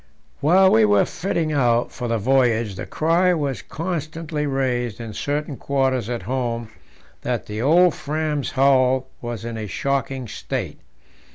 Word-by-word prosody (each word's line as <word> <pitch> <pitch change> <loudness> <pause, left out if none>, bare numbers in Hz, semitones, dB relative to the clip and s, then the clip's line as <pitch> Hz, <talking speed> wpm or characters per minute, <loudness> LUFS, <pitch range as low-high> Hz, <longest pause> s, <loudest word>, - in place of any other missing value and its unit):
While 185 +6 +5
we 110 - +5
were 105 -1 +4
fitting 165 -3 -2
out 120 -4 +2
for 125 - -5
the 115 0 0
voyage, 115 -2 +2
the 95 - -7
cry 175 +3 +2
was 140 -5 -2
constantly 160 -2 -4
raised 125 -4 -1
in 115 -2 -6
certain 145 +3 -3
quarters 130 -4 0
at 120 -1 -3
home 120 -3 -3 0.5
that - - -2
the 105 +1 -5
old 170 +6 +5
Fram's 150 -1 -2
hull 130 -1 +3
was 120 -2 -5
in 115 -1 -4
a 105 - -4
shocking 135 +4 -2
state. - - -5
135 Hz, 150 wpm, -22 LUFS, 120-150 Hz, 0.5 s, While